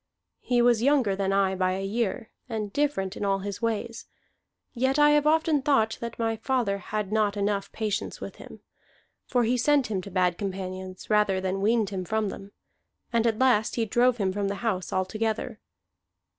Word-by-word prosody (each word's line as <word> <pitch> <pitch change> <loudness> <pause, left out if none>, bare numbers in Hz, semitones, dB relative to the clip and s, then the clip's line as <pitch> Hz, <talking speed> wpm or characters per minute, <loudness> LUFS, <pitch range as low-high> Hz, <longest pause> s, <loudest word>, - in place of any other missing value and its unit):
He 245 -1 +1
was 240 -2 +4
younger 255 -7 +3
than 195 0 -1
I 195 -1 +2
by 185 0 0
a 195 +1 -3
year, 225 +2 -2 0.2
and 215 -3 -4
different 275 -10 0
in - - -5
all 195 -1 +2
his 200 +1 -6
ways; 230 0 -3 0.7
yet 260 +2 +1
I 295 0 +6
have 295 0 +3
often 315 -1 +3
thought 260 -6 +2
that 235 -1 -5
my 225 -1 -1
father 225 -5 0
had 210 +1 -4
not 210 -1 +1
enough 200 0 -1
patience 215 -2 -3
with - - -8
him. - - -12 0.7
For 245 -1 +2
he 240 +2 +1
sent 275 -1 +2
him 190 -3 -1
to 200 - -9
bad 180 -2 +1
companions 185 -1 -5
rather 210 -3 +3
than 190 +1 -2
weaned 215 -1 +2
him 190 -2 -3
from 215 +2 -1
them, 195 +1 -9 0.6
and 230 0 +3
at 225 -2 +1
last 245 -4 +3
he 230 - 0
drove 240 +3 +2
him 190 -4 0
from 200 0 -1
the 200 - -2
house 185 -5 -1
altogether. 215 +4 -2
215 Hz, 185 wpm, -26 LUFS, 195-240 Hz, 0.7 s, I